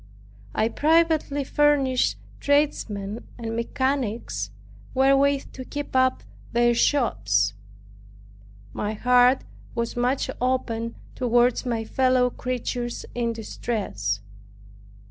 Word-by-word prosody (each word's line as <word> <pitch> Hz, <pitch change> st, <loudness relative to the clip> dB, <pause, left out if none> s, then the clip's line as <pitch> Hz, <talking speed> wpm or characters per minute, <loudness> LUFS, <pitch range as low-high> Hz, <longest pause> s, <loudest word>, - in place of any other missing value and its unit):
I 220 Hz, -, +2 dB
privately 310 Hz, 0 st, +2 dB
furnished 275 Hz, -3 st, +2 dB, 0.2 s
tradesmen 230 Hz, -8 st, 0 dB
and 225 Hz, -1 st, -4 dB
mechanics 235 Hz, -, -1 dB, 0.5 s
wherewith 275 Hz, +1 st, +3 dB
to 260 Hz, -, -7 dB
keep 290 Hz, +1 st, -6 dB
up 260 Hz, 0 st, +3 dB, 0.3 s
their 240 Hz, 0 st, +4 dB
shops. 105 Hz, -, +2 dB, 1.2 s
My 210 Hz, +1 st, -2 dB
heart 250 Hz, +3 st, +4 dB, 0.3 s
was 235 Hz, -1 st, -2 dB
much 250 Hz, +3 st, +1 dB
opened 230 Hz, -3 st, -1 dB, 0.2 s
toward 245 Hz, 0 st, +2 dB
my 230 Hz, -2 st, -1 dB
fellow 255 Hz, +1 st, +2 dB
creatures 245 Hz, -1 st, -3 dB
in 235 Hz, -1 st, 0 dB
distress. 195 Hz, -, -3 dB
245 Hz, 90 wpm, -25 LUFS, 225-265 Hz, 1.2 s, their